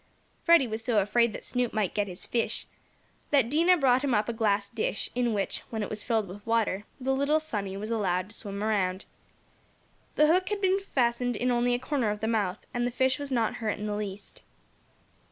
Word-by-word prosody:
Freddie 335 -5 +6
was 220 -1 -4
so 230 -2 +1
afraid 230 +4 +2
that - - -8
Snoop 245 -2 0
might 210 -4 0
get 205 -1 0
his 180 -1 -6
fish, 235 -1 -1 0.6
that 265 -5 +3
Dinah 340 +4 +5
brought 260 -3 +3
him 265 -4 +2
up 210 0 +1
a 235 - -2
glass 205 -3 +1
dish, 215 -1 -3
in 245 -1 +1
which, 200 -2 -1
when 220 -2 -3
it - - -5
was 215 0 -3
filled 220 -4 0
with 200 +3 -10
water, 220 -3 0
the 265 +1 0
little 280 +3 +2
"sunny" 205 -11 -4
was 215 +3 -5
allowed 185 -4 0
to 215 - -10
swim 200 -2 -5
around. 195 -3 0 1.1
The 300 - +5
hook 365 +4 +3
had 415 -1 -1
become 385 0 +2
fastened 245 -8 0
in 250 +3 0
only 245 0 +2
a - - +1
corner 255 -2 -1
of 210 0 -2
the 220 - -2
mouth, 210 -4 -1
and 240 0 0
the - - 0
fish 260 +2 +1
was 285 -1 -5
not 230 -4 +1
hurt 220 -2 -2
in 210 - -5
the 210 - -2
least. 205 -1 -6
230 Hz, 215 wpm, -28 LUFS, 210-255 Hz, 1.1 s, Freddie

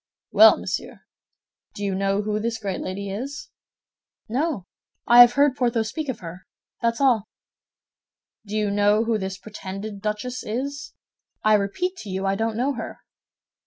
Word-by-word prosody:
"Well, - - +8
monsieur, - - -5 0.7
do 205 - -6
you 200 -1 0
know 195 +1 0
who 210 0 -1
this 225 +1 -2
great 200 -4 -4
lady 195 +1 -4
is?" 280 +8 -6 0.8
"No; 255 - -1 0.4
I 240 +1 +9
have 245 0 +8
heard 280 0 +3
Porthos 235 -3 0
speak 310 +1 -4
of 260 - -4
her, 180 +2 -9 0.3
that's 230 -1 0
all." 240 -6 +3 1.1
"Do 210 0 -6
you 210 -1 0
know 205 +2 +3
who 225 -1 0
this 190 -1 -4
pretended 200 0 -7
duchess 215 +4 -3
is? 280 +7 -4 0.5
"I 215 - +5
repeat 215 - 0
to 215 - -8
you, 190 +1 -3
I 195 - +2
don't 225 +2 -1
know 265 +4 +1
her." - - -7
215 Hz, 160 wpm, -24 LUFS, 200-250 Hz, 1.1 s, I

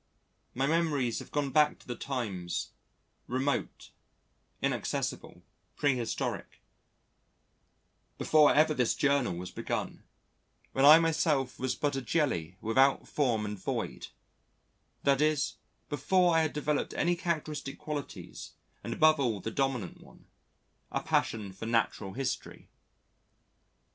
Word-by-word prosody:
My 130 +2 +1
memories 150 -6 +1
have - - -10
gone 145 -2 -1
back 150 +2 +4
to - - -20
the 120 - -4
times 105 -12 -4 0.6
remote, 130 +2 -2 0.7
inaccessible, - - -3 0.3
prehistoric 125 -5 -2 1.6
before 155 -1 +5
ever 155 +1 +4
this 125 -5 +1
Journal 140 -9 +1
was 90 +1 -6
begun, - - -4 0.7
when 135 - +3
I 150 +2 +11
myself 160 -5 +1
was 130 0 -1
but 145 -2 -1
a 135 - -2
jelly 105 - -1
without 135 +5 +3
form 120 -7 0
and 105 -1 -5
void - - -4 1.0
that 140 0 +3
is, 155 -2 +1 0.3
before 175 +5 +2
I 165 - +5
had 155 -1 -1
developed 150 0 -1
any 175 0 +2
characteristic 155 -5 -3
qualities 150 -2 -7 0.3
and - - -3
above 155 -1 +4
all 120 -7 0
the 115 - -4
dominant 130 -7 -2
one, - - -18 0.7
a - - -2
passion 105 -4 0
for 115 +4 -7
Natural 115 -4 0
History. 130 -1 -4
135 Hz, 120 wpm, -30 LUFS, 120-150 Hz, 1.6 s, I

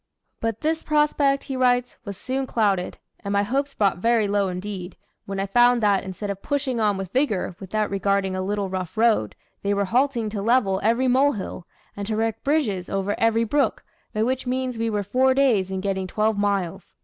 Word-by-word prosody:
"But 225 -1 -2
this 320 +1 0
prospect," 295 -2 +2
he 270 - -5
writes, 250 -1 +2
"was 200 -2 -6
soon 265 +1 -3
clouded, 200 -7 0 0.2
and 200 - -5
my 200 0 +2
hopes 275 +6 -1
brought 195 -4 +1
very 230 0 +2
low 200 -1 +1
indeed, 185 0 -5 0.3
when 195 0 -4
I 195 - 0
found 240 +3 +4
that, 200 -2 +3
instead 195 +2 -5
of 195 0 -7
pushing 275 -4 -1
on 210 -3 +2
with 190 -2 -5
vigor, 215 -9 0
without 210 +2 -2
regarding 195 -1 0
a 185 - -2
little 200 +1 -1
rough 185 0 -5
road, 220 - +2 0.3
they 200 0 0
were 200 0 +1
halting 240 +1 +1
to 205 -2 -3
level 210 -4 +2
every 235 +4 +2
molehill, 250 -8 +1 0.3
and 200 0 -5
to 220 - -1
erect 225 0 -1
bridges 240 - 0
over 195 +1 -1
every 225 0 +3
brook, 280 +6 0 0.3
by 215 - 0
which 255 +2 -1
means 255 -2 -2
we 230 0 0
were 210 -2 -1
four 260 +6 +2
days 235 -9 +3
in 190 0 -3
getting 190 -1 -2
twelve 215 +3 +1
miles." 200 -3 -2
215 Hz, 195 wpm, -24 LUFS, 195-250 Hz, 0.3 s, found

